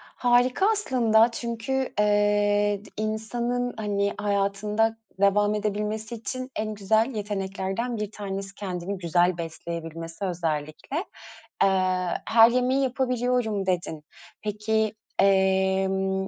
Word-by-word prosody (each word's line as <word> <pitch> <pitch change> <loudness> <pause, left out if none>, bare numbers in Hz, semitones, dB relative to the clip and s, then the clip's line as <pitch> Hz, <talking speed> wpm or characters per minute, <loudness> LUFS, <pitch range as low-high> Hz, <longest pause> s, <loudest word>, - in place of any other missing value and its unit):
Harika 245 +7 +3
aslında 235 - +3
çünkü, 235 +3 -3
eee, 205 0 +2
d - - -13
insanın 235 +3 -2
hani 205 -1 0
hayatında 210 +2 0 0.2
devam 205 +1 +3
edebilmesi 210 +2 -2
için 255 +3 -6
en 215 0 -2
güzel 220 +4 +2
yeteneklerden 200 +3 -3
1 210 -1 -3
tanesi 195 -2 -5
kendini 190 -1 -4
güzel 175 0 +2
besleyebilmesi 165 +1 -6
özellikle. 165 - -3 0.7
Eee, 185 -2 +1
"her 225 +1 +7
yemeği 255 +2 +2
yapabiliyorum" 250 -5 0
dedin. 175 -4 -2 0.4
Peki, 215 +1 0 0.3
emm, 190 0 +2
205 Hz, 100 wpm, -26 LUFS, 190-225 Hz, 0.7 s, her